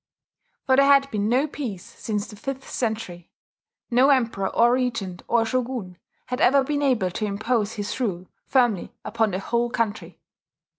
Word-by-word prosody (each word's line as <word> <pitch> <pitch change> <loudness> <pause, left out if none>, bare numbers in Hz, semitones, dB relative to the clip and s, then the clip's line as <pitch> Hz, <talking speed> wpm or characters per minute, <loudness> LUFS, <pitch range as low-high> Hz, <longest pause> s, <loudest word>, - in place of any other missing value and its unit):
For 260 -1 +3
there 275 0 +6
had 275 0 +4
been 210 0 0
no 255 +5 +3
peace 245 -11 -6
since 210 -2 -4
the 215 - -11
fifth 265 +5 -6
century. 215 -7 -4 0.6
No 255 +4 +5
emperor 230 -8 +2
or 235 +1 +4
regent 230 -8 -2
or 235 -1 +2
shogun 240 -6 -3 0.3
had 250 0 -4
ever 275 +2 +5
been 290 +1 -1
able 245 -10 +1
to 215 - -2
impose 215 +1 -1
his 205 +3 -4
rule 185 -8 -2 0.2
firmly 240 -8 +1
upon 225 0 +1
the 185 - -2
whole 235 +4 -1
country. 225 -3 -3
235 Hz, 160 wpm, -24 LUFS, 205-255 Hz, 0.6 s, there